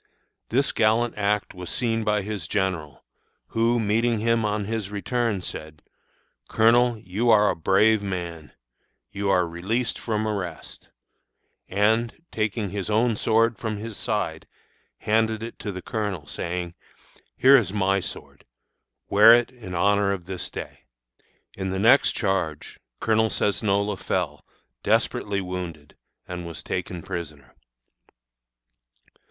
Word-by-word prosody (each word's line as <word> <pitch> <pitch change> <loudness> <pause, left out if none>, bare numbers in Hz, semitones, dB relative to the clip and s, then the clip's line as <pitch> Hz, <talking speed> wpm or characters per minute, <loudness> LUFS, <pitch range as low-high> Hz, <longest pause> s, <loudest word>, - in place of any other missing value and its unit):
This 135 +4 +2
gallant 115 +2 +2
act 105 0 0
was 90 -1 -7
seen 115 -2 0
by 105 -1 +1
his 100 -5 -4
general, 90 -9 -2 0.5
who, 115 +1 +2
meeting 115 +2 +1
him 115 +1 +1
on 105 -1 -1
his 110 -2 -3
return, 105 0 -1
said: 80 -3 -7 0.7
'Colonel, 120 +1 +4
you 105 +4 -1
are 105 -2 +5
a - - -3
brave 100 +5 +3
man; 85 -5 -5 0.6
you 100 0 -2
are 90 -2 +3
released 105 +9 -2
from 110 -1 -1
arrest;' 95 -6 -5 0.8
and, 110 +6 +1
taking 105 -2 -2
his 100 0 -3
own 115 +2 +2
sword 115 +2 +2
from 110 -2 -3
his 110 +1 -6
side, 105 -9 -2 0.5
handed 110 0 +1
it 115 - -8
to 105 - -4
the 95 -1 -7
colonel, 105 -8 -3
saying: 85 +2 -4 0.6
'Here 135 +3 +7
is 110 -8 +3
my 95 -1 +1
sword; - - -8 0.6
wear 110 +3 +8
it 120 +1 0
in 110 -8 -8
honor 100 +2 +3
of 90 -3 -6
this 95 -1 -5
day!' - - -8 0.7
In 95 -1 -4
the 95 - -2
next 115 +8 +5
charge 95 -7 -2 0.2
Colonel 110 0 +2
Cesnola 100 -1 0
fell, - - -2 0.4
desperately 100 -1 +1
wounded, 90 -5 -6 0.3
and 90 -1 -6
was 85 - -7
taken 90 -2 -4
prisoner. 75 -7 -7
105 Hz, 130 wpm, -25 LUFS, 90-110 Hz, 0.8 s, wear